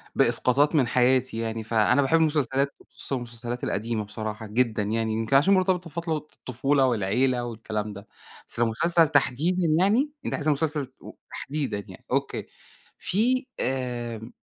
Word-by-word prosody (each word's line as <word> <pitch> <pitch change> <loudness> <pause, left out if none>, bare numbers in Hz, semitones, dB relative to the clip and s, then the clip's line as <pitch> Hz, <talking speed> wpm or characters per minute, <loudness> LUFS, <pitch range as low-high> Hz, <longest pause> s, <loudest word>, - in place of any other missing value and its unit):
بإسقاطات 140 +5 +3
من 135 -5 +3
حياتي 125 0 +2
يعني، 115 -1 -3
فأنا 110 +4 +3
باحب 140 +4 +3
المسلسلات 140 -3 +1
وخصوصًا 140 - -6
المسلسلات 120 0 -5
القديمة 110 +1 -2
بصراحة 110 +1 -6
جدًا، 110 0 0
يعني 110 +1 -1
يمكن 110 +4 0
عشان 150 +9 +5
مرتبطة 185 -2 +1
بفترة 165 0 -2
الطفولة 135 -2 -1
والعيلة 120 +3 +1
والكلام 110 -2 -4
ده، 100 +1 -11 0.4
بس - - -4
مسلسل 160 +9 +4
تحديدًا 160 +6 +1
يعني؟ 225 +11 +2
أنتِ - - -2
عايزة 155 +1 +1
مسلسل 150 -1 -1
و - - -10 0.2
تحديدًا 145 -7 -3
يعني، - - -13
أوكي، - - -1 0.5
في 250 +7 +1
آآ، 120 -3 -3
130 Hz, 140 wpm, -25 LUFS, 115-155 Hz, 0.5 s, عشان